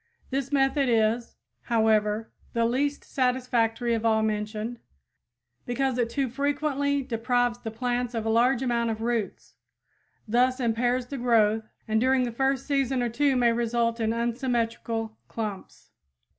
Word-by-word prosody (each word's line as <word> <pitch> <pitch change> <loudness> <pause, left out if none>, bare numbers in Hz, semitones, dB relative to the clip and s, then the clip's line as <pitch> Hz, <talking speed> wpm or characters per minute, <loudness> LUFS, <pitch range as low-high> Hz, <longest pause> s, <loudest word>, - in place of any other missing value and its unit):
This 270 +1 -2
method 275 -1 +2
is, 230 +1 +1 0.3
however, 220 -1 +1 0.2
the 230 0 +2
least 280 +5 0
satisfactory 245 -2 0
of 225 -1 -1
all 220 -1 +3
mentioned, 215 +2 -3 0.9
because 260 +1 0
it 235 -1 +1
too 275 +2 -1
frequently 285 +1 0
deprives 245 0 0
the 225 - -5
plants 245 +1 -2
of 225 -1 -2
a - - 0
large 240 +3 +3
amount 235 -2 0
of 220 0 -3
roots, 230 -3 -2 0.7
thus 250 +4 +2
impairs 245 +1 +1
the 275 +1 -6
growth, 220 -2 +2 0.2
and 220 0 +1
during 260 0 +3
the 240 - -2
first 270 +2 0
season 270 -3 +1
or 240 - 0
two 275 +3 +2
may 240 -2 +3
result 235 0 0
in 220 -1 +1
unsymmetrical 230 -2 -2
clumps. 210 -4 -6
240 Hz, 145 wpm, -26 LUFS, 225-260 Hz, 0.9 s, all